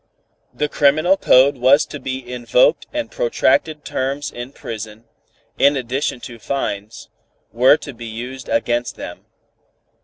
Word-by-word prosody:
The 150 - -2
criminal 155 +6 +3
code 140 -5 +4
was 130 +4 +4
to 145 - -8
be 130 -2 -5
invoked 125 +4 +2
and 300 -1 -4
protracted 475 - +1
terms 135 +2 -3
in 120 +2 -7
prison, 110 -3 -8 0.6
in 140 0 +4
addition 130 +1 -2
to 120 -2 -9
fines, 105 -4 -4 0.4
were 125 +5 +5
to 140 - -9
be 115 0 -9
used 125 +4 -7
against 120 0 0
them. - - -9
130 Hz, 130 wpm, -19 LUFS, 120-145 Hz, 0.6 s, were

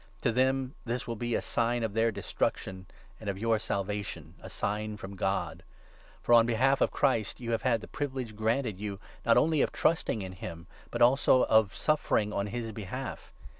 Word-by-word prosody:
To - - +2
them 130 +2 +1
this 120 +1 -3
will 115 - -2
be 120 +1 -1
a - - -1
sign 120 0 0
of 110 -3 -2
their 115 +1 +2
Destruction 95 -2 -3 0.3
and 110 - -5
of 95 - -2
your 110 +1 +1
Salvation 100 -1 -3
— - - -22
a - - -9
sign 105 +1 -2
from 100 -1 -8
God. 95 +1 -1 0.6
For, - - -1
€>n - - +10
29 115 - +6
behalf 130 +4 +2
of - - +4
Christ, 115 -7 0
you 120 -2 -4
have 115 - 0
had 115 -4 +2
the - - -9
privilege 130 -6 -4
granted 110 -1 0
you, 100 -2 -4 0.3
not 115 - +6
only 155 -2 +3
of - - +1
trusting 155 -10 +1
in 95 - -6
him, 85 -2 -8 0.2
but 120 0 +2
also 130 +1 +5
of 110 -3 +3
suffering 110 -8 +1
on 100 +1 -1
his 115 +1 -4
behalf. 110 +5 -6
115 Hz, 200 wpm, -30 LUFS, 105-125 Hz, 0.6 s, €>n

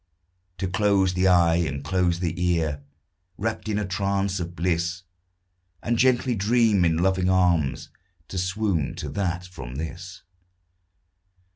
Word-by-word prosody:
To 95 - -2
close 95 -1 +2
the 90 +1 +2
eye, 85 -2 +4
and 70 -5 -2
close 85 +2 +1
the 85 -2 -1
ear, 80 -5 0 0.6
Rapt 110 +1 -3
in 105 - 0
a 105 - -1
trance 100 +1 -1
of 85 0 -5
bliss, 85 0 -1 0.8
And 120 - 0
gently 130 -1 +3
dream 110 -1 +3
in 80 -2 +2
loving 95 +1 +1
arms 85 -8 +1 0.4
To 95 - -3
swoon 95 -5 -1
to 75 - -5
that 90 +2 -2
from 65 -9 -9
this. 85 +5 -7
90 Hz, 135 wpm, -25 LUFS, 85-100 Hz, 0.8 s, eye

